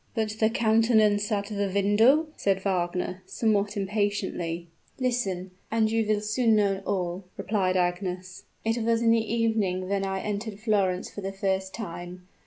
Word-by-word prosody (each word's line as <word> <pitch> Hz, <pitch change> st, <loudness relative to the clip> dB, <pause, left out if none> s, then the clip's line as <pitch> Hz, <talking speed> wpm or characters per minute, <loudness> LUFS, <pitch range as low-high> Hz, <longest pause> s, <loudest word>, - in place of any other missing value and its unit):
"But 215 Hz, -1 st, -1 dB
the 220 Hz, -, +4 dB
countenance 220 Hz, -2 st, +3 dB
at 200 Hz, -1 st, 0 dB
the 200 Hz, -2 st, -2 dB
window?" 215 Hz, +10 st, +4 dB
said 195 Hz, -1 st, 0 dB
Wagner, 180 Hz, -1 st, -1 dB
somewhat 210 Hz, -2 st, 0 dB
impatiently. 195 Hz, -4 st, -2 dB, 0.3 s
"Listen 200 Hz, -8 st, -1 dB, 0.2 s
and 220 Hz, -1 st, +2 dB
you 225 Hz, 0 st, +2 dB
will 210 Hz, -1 st, +1 dB
soon 220 Hz, +2 st, +2 dB
know 200 Hz, -2 st, +2 dB
all," 180 Hz, -1 st, -2 dB
replied 190 Hz, -3 st, 0 dB
Agnes. 180 Hz, 0 st, -2 dB, 0.2 s
"It 225 Hz, +1 st, +1 dB
was 230 Hz, 0 st, +2 dB
in 230 Hz, -, +5 dB
the 230 Hz, 0 st, +4 dB
evening 215 Hz, -6 st, 0 dB
when 200 Hz, 0 st, 0 dB
I 190 Hz, 0 st, -2 dB
entered 210 Hz, 0 st, -4 dB
Florence 200 Hz, -5 st, 0 dB
for 205 Hz, -, -7 dB
the 195 Hz, 0 st, -3 dB
first 190 Hz, -1 st, -2 dB
time. 180 Hz, -3 st, -7 dB
200 Hz, 155 wpm, -27 LUFS, 185-220 Hz, 0.3 s, in